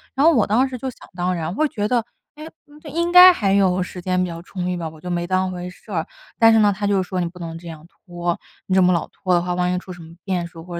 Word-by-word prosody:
然 280 +3 +2
后 330 - +6
我 230 -6 +3
当 245 +6 +2
时 255 -1 -6
就 260 +2 -4
想 - - -14
当 180 +1 -1
然， 170 +2 -4
会 310 - +2
觉 205 0 -2
得， 235 -2 0 0.3
唉， 305 +1 -9 0.5
应 340 +1 -1
该 360 +1 +10
还 200 - 0
有 185 -2 +3
时 180 0 -8
间 185 0 0
比 180 - 0
较 170 0 -7
充 180 0 -5
裕 180 - -1
吧。 165 -2 -4
我 155 0 -15
就 180 - -8
没 175 0 -1
当 185 0 0
回 180 0 -6
事 180 - -15
儿。 - - -1 0.3
但 225 0 +6
是 220 - +5
呢， 205 -1 +4
他 205 +1 -3
就 195 -2 +2
说： 185 0 -4
“你 - - 0
不 180 +1 -11
能 165 -1 -6
这 170 0 -12
样 160 0 -10
拖， 175 -2 -5 0.3
你 190 - -1
这 190 - +5
么 180 0 +4
老 170 - -1
拖 185 -2 -2
的 175 - +3
话， 180 0 -2
万 180 0 0
一 - - 0
出 185 0 -8
什 175 - -12
么 165 +1 -13
变 180 -3 -2
数 165 -1 -12
或 175 0 -8
180 Hz, 320 characters per minute, -21 LUFS, 175-205 Hz, 0.5 s, 该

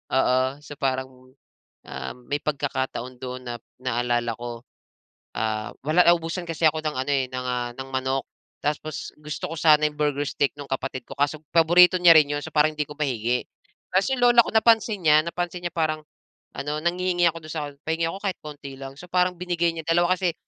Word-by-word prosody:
oo, 130 -1 +3 0.2
so 145 - -9
parang, 130 -1 -1 0.8
um, 65 0 -6
may 145 - 0
pagkakataon 130 -3 -3
dun 130 0 -6
na 120 0 -5 0.2
naalala 120 -1 0
ko. 120 -1 -7 0.7
Ah, 110 -1 -2
wala 160 +4 +4
naubusan 170 +1 +2
kasi 165 0 -5
ako 155 0 +1
ng 155 -1 -2
ano, 130 +2 -1
eh, 135 -2 +2
ng, 130 0 -4
ah, 125 -1 -2
ng 135 0 -7
manok. 130 0 -1 0.4
Tapos, 150 +1 -3
gusto 150 0 -5
ko - - -4
sana 155 -1 +5
yung 150 - -6
burger 145 -1 0
steak 140 - +1
nung 145 - -6
kapatid 135 -1 -4
ko. - - -7
Kaso 145 +2 +1 0.2
paborito 175 +2 +6
niya 175 -1 +9
rin 150 -2 +6
yun. 145 - -2
So - - -6
parang 155 0 +3
hindi 150 - -2
ko 150 - -9
mahingi. 125 -4 -1 0.5
Ta's 190 +7 +3
yung 265 - +1
lola 240 -1 +7
ko - - -5
napansin 220 -1 +3
niya, 150 0 +7
napansin 175 +1 -3
niya - - 0
parang 155 -1 0 0.6
ano 150 +2 -2
nanghihingi 175 +1 +1
ako 165 0 -7
dun 155 - -7
sa 150 -3 -3 0.2
"Pahingi 165 +1 0
ako 190 - -6
kahit 195 - +1
konti 145 -2 -8
lang." 135 0 -8
So, 175 - -10
parang 180 0 +2
binigay 175 -1 0
niya, 160 -1 -6
dalawa 175 +2 +3
kasi 180 -2 0
150 Hz, 195 wpm, -24 LUFS, 130-170 Hz, 0.8 s, niya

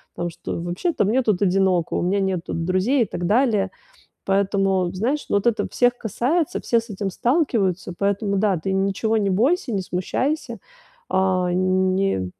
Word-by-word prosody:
там, 175 0 -3
что: 170 - -6
"Вообще-то 175 - -1
мне 235 +6 +2
тут 210 -5 +1
одиноко, 185 -3 +2
у - - 0
меня 190 +3 +1
нету 190 -3 -2
друзей", 185 +10 +1
и - - -2
так 175 - -4
далее. 210 -2 +2 0.5
Поэтому, 195 -2 +1
знаешь, 245 +10 -1
ну, - - +3
вот 200 - 0
это 230 -2 +1
всех 245 0 +2
касается, 265 - -1
все 235 - +2
с 230 - -15
этим 200 -1 -3
сталкиваются, 210 - 0
поэтому 200 0 0
да, 195 -2 +2
ты 190 +4 -3
ничего 195 +3 0
не 200 -2 +1
бойся, 255 - +1
не 195 - 0
смущайся, 255 - -2 0.5
а, 185 -1 +1
не 185 - +1
195 Hz, 165 wpm, -22 LUFS, 185-230 Hz, 0.5 s, ну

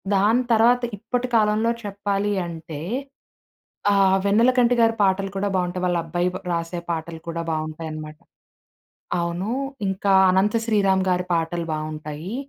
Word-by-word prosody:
దాని 220 +6 +3
తర్వాత 240 +3 +4 0.2
ఇప్పటి 245 +4 -2
కాలంలో 215 +2 +2
చెప్పాలి 200 0 -1
అంటే 160 -2 -7 1.1
ఆహ్, 195 -1 +4
'వెన్నెలకంటి' 240 +4 +4
గారి 225 0 +3
పాటలు 195 0 +1
కూడా 200 +1 0
బాగుంటాయి. 180 0 -1
వాళ్ళ 175 -1 +1
అబ్బాయి 175 +2 0
పా - - -4
రాసే 170 +1 -2
పాటలు 165 0 -4
కూడా 170 0 -3
బాగుంటాయి 155 0 -4
అన్నమాట. 155 0 -8 1.0
అవును, 170 +5 -2 0.4
ఇంకా 190 +1 +1 0.2
'అనంత 190 +4 +2
శ్రీరాం' 195 -4 +2
గారి 180 0 +1
పాటలు 165 +1 -1
బాగుంటాయి, 155 +5 -5
190 Hz, 130 wpm, -23 LUFS, 165-210 Hz, 1.1 s, తర్వాత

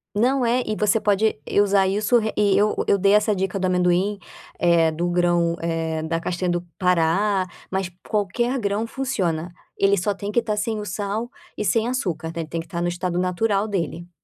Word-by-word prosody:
Não, 255 +5 +2
é, 245 +2 +2
e 215 - -2
você 210 +2 +2
pode 210 -1 +1 0.2
usar 200 -1 +3
isso 210 +5 +2 0.2
e 200 -2 +3
eu 210 +1 +2
eu 200 - +4
dei 195 +1 +3
essa 210 0 +3
dica 190 0 -2
do 190 - 0
amendoim, 180 +2 +2 0.4
eh, 170 -2 +3
do 170 +3 -2
grão, 175 -1 +2
eh, 165 -1 -2
da 165 +1 -2
castanha 180 +1 -2
do 175 0 0 0.2
Pará, 185 +2 +2 0.2
mas 190 -1 -2 0.2
qualquer 235 +5 0
grão 210 +1 -1
funciona, 185 -11 -2 0.2
ele 195 0 +4
só 200 +3 0
tem 200 +1 -5
que 235 - +3
estar 215 -2 -2
sem 215 +1 -1
o 210 - -5
sal 205 +4 -3 0.3
e - - -3
sem 220 +3 +1
açúcar, 175 -11 -2
né, 165 +1 -4
ele 160 - -6
tem 165 +1 -4
que 165 - -6
estar 170 -2 -5
no 175 - 0
estado 175 0 -2
natural 195 +3 0
dele. 175 -3 -3
195 Hz, 200 wpm, -23 LUFS, 175-210 Hz, 0.4 s, eu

